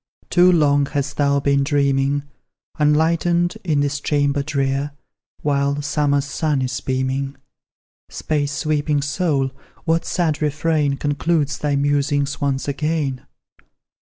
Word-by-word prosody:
Too 180 0 +6
long 145 -4 +3
hast 140 -1 -3
thou 140 -1 +2
been 140 0 +2
dreaming 140 0 +1 0.6
Unlightened, 170 +3 +2
in 155 -5 +1
this 145 0 -1
chamber 145 -1 +1
drear, 140 0 -1 0.5
While 140 0 0
summer's 145 0 +1
sun 145 -1 -1
is 125 0 -3
beaming! 130 +1 -2 0.7
Space 145 -2 -2
sweeping 150 -1 0
soul, 140 -3 0 0.3
what 165 0 +1
sad 160 -5 -1
refrain 150 -1 +1
Concludes 145 +1 0
thy 145 -1 0
musings 145 0 0
once 140 -1 -1
again? 145 -2 -2
145 Hz, 115 wpm, -21 LUFS, 140-150 Hz, 0.7 s, Too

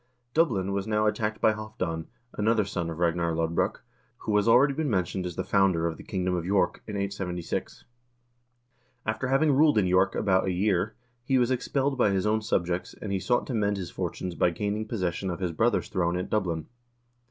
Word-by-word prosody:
Dublin 110 - +2
was 100 +1 -2
now 105 0 +1
attacked 110 0 0
by 110 - +4
Halvdan, 90 -7 -4 0.3
another 110 0 +2
son 90 -4 -3
of 80 - -5
Ragnar 85 -1 +1
Lodbrok, 80 0 -1 0.3
who 105 - -2
has 105 - +2
already 135 +5 +6
been 155 +1 -1
mentioned 95 -2 -1
as 90 - -6
the - - -2
founder 95 -4 +2
of 85 -1 -1
the - - -11
king 95 -2 -3
dom 90 - +1
of 90 -2 -1
York, 95 0 +1
in 105 - -5
876. 95 -4 -4 1.2
After 110 +4 -1
having 135 +4 +3
ruled 145 -1 +4
in 105 - +4
York 95 +1 +3
about 95 -2 +2
a 95 - 0
year, 95 +2 +1 0.3
he 130 +2 +2
was 125 0 +2
expelled 135 +1 0
by 105 - +4
his 95 -1 0
own 110 +1 +2
subjects, 90 -3 -1
and 105 - -5
he 95 - 0
sought 120 +7 +1
to 130 - -4
mend 105 -2 +1
his 90 -4 -5
fortunes 90 -1 -4
by 85 - +2
gaining 105 +5 -2
possession 95 -3 -2
of 85 - -4
his 90 -3 -1
brother's 115 +9 +1
throne 90 -2 0
at 90 - -4
Dublin. 90 -7 0
100 Hz, 200 wpm, -27 LUFS, 90-110 Hz, 1.2 s, already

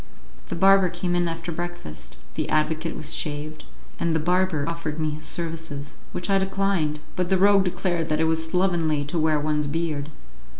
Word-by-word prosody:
The - - -2
barber 195 +1 +5
came 175 +1 -2
in 175 0 +2
after 165 +1 -4
breakfast; 170 - -7 0.2
the - - -2
advocate 155 +1 0
was 155 0 0
shaved, 155 +1 -3 0.3
and 165 -1 +1
the - - +2
barber 180 -2 +1
offered 165 -2 -3
me 155 -1 0
his 155 +1 -6
services, 160 -4 -3 0.2
which 180 - -3
I 195 -1 +3
declined, 190 -6 0
but 180 -1 -1
the 190 - +4
rogue 200 0 +5
declared 175 -2 -1
that 155 0 +1
it - - +3
was 160 0 +2
slovenly 160 -4 +1
to 165 +4 -2
wear 155 -1 +3
one's 150 0 0
beard. 150 -1 -2
165 Hz, 180 wpm, -25 LUFS, 155-175 Hz, 0.3 s, barber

